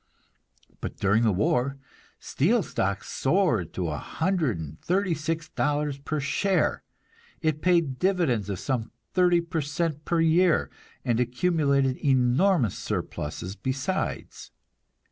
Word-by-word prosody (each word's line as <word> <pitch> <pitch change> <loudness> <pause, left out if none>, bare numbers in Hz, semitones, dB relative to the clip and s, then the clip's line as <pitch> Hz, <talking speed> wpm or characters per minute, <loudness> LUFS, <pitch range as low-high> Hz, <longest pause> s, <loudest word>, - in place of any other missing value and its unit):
But - - -6
during 105 +3 +2
the 115 -2 +3
war, 125 +8 +1 0.4
steel 205 - +1
stock 100 -8 -2
soared 135 - +1
to 90 -3 -2
a 75 -1 -3
hundred 160 - -1
and 75 -1 -8
thirty 185 0 +1
six 160 +1 -3
dollars 145 -2 -1
per 150 +2 -3
share; 185 +7 +1 0.6
it 155 -2 -1
paid 170 -8 +2
dividends 170 - +1
of 100 - -2
some 120 +1 -2 0.2
thirty 175 -2 +4
per 170 -1 -2
cent 150 +1 -2
per 170 +1 0
year, 165 +1 +3 0.3
and 120 -2 +1
accumulated 140 0 +1
enormous 130 - +3
surpluses 90 +6 -4
besides. 135 - -3
145 Hz, 125 wpm, -26 LUFS, 120-170 Hz, 0.6 s, thirty